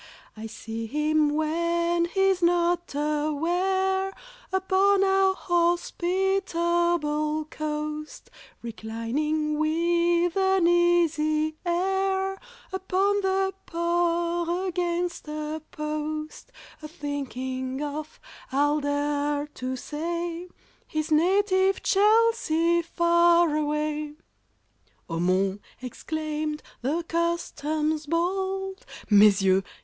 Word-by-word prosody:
"I 220 +1 -7
see 225 +1 -6
him 300 +3 +2
when 340 +3 0
he's 385 +1 +1
not 345 -2 +1
aware, 350 +6 0 0.4
Upon 380 +1 +3
our 385 0 +3
hospitable 345 -3 0
coast, 305 0 -5 0.3
Reclining 260 +8 -2
with 340 +2 +2
an 380 -2 +3
easy 325 -3 +2
air 385 +2 0 0.4
Upon 385 +2 +1
the 385 0 0
Port 345 +1 0
against 350 -1 -2
a 305 +1 -4
post, 305 +4 -5 0.3
A 305 - -7
thinking 260 -3 -4
of, 295 +1 -6 0.3
I'll 290 +3 +2
dare 290 0 -1
to 260 -3 -5
say, 340 +5 -4 0.4
His 310 0 -3
native 380 +4 +3
Chelsea 400 -6 +3
far 340 -1 +3
away!" 300 0 -2 0.9
"Oh, 165 -1 -3
mon!" 190 +3 +1 0.2
exclaimed 305 +4 -4 0.2
the 300 +7 -1
Customs 315 -2 -1
bold, 380 +3 -2 0.3
"Mes 205 -1 +6
yeux!" 190 0 +4
335 Hz, 85 wpm, -26 LUFS, 300-355 Hz, 0.9 s, Mes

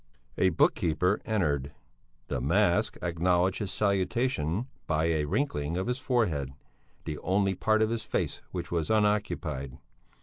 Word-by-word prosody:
A 95 - +5
book 80 - +3
keeper 90 +5 +1
entered. 75 - 0 0.5
The 60 - -2
mask 85 +6 +2
acknowledged 90 +2 +1
his 100 -3 -3
salutation 100 - 0 0.2
by 80 -1 +1
a 80 -2 +1
wrinkling 80 - -1
of 95 - -1
his 125 +2 -1
forehead, 105 - 0 0.5
the 75 -2 -4
only 95 +1 +1
part 110 +4 +2
of 110 - 0
his 115 -1 -1
face - - -2
which 85 -2 -5
was 85 -3 -1
unoccupied. 105 -11 0
90 Hz, 140 wpm, -29 LUFS, 80-105 Hz, 0.5 s, A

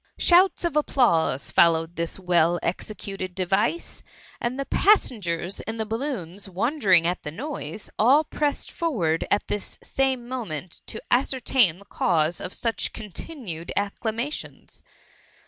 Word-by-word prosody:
Shouts 360 +1 +5
of 340 -3 -1
applause 170 - +2
followed 165 0 +3
this 170 0 -2
well 175 -2 +2
executed 185 0 -4
device; 195 - 0 0.4
and 245 +3 -2
the 275 - -1
passengers 200 - +2
in 220 +1 -5
the 220 - -1
balloons 210 - -4
won 235 - -1
dering 185 - +5
at 175 +1 0
the - - -5
noise, 210 - -6
all 270 +8 +6
pressed 295 -1 -2
forward 190 - 0
at 205 - +2
t^|| 205 - -3
same 265 -3 0
moment 185 - -5
to 220 - -5
ascertain 245 - +3
the 200 - -16
cause 165 -4 +1
of 180 - -4
such 230 +2 -2
cdii^ 210 -4 -9
tinned 185 - -5
acclamation^. 225 +7 -3
205 Hz, 135 wpm, -25 LUFS, 175-260 Hz, 0.4 s, all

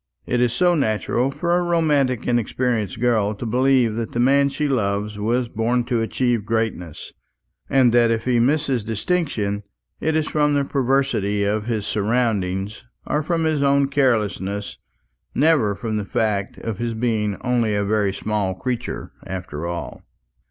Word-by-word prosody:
It 125 0 0
is 120 -1 +3
so 175 +7 +3
natural 120 -2 0
for 170 +5 0
a 180 - +2
romantic 150 -8 +1
inexperienced 120 -3 0
girl 110 -4 +1
to 110 - -6
believe 125 0 +3
that 115 -1 -4
the 120 - -1
man 140 +3 +4
she 145 +2 -2
loves 105 -4 -1
was 120 +4 0
born 115 +2 0
to 120 -1 -1
achieve 120 0 0
greatness; 110 -7 -3 0.6
and 130 -4 +4
that 120 -1 +5
if 115 0 -1
he 125 -2 +2
misses 135 -1 +1
distinction, 110 - -1 0.4
it 160 0 0
is 155 -1 +1
from 150 -1 +2
the 140 -1 +1
perversity 130 -7 +1
of 105 +2 -1
his 110 -4 -1
surroundings 105 -3 -1 0.2
or 150 - 0
from 165 +1 -1
his 155 -2 +1
own 140 0 +3
carelessness, 105 -7 0 0.6
never 140 -9 +3
from 110 +1 -3
the 105 - -3
fact 100 -2 -1
of 115 -4 -5
his 120 -1 -2
being 110 -3 0
only 120 -4 +1
a 100 0 0
very 105 -1 +1
small 100 -2 -2
creature 125 +4 -4 0.2
after 85 -4 -5
all. 85 0 -5
115 Hz, 160 wpm, -22 LUFS, 105-135 Hz, 0.6 s, that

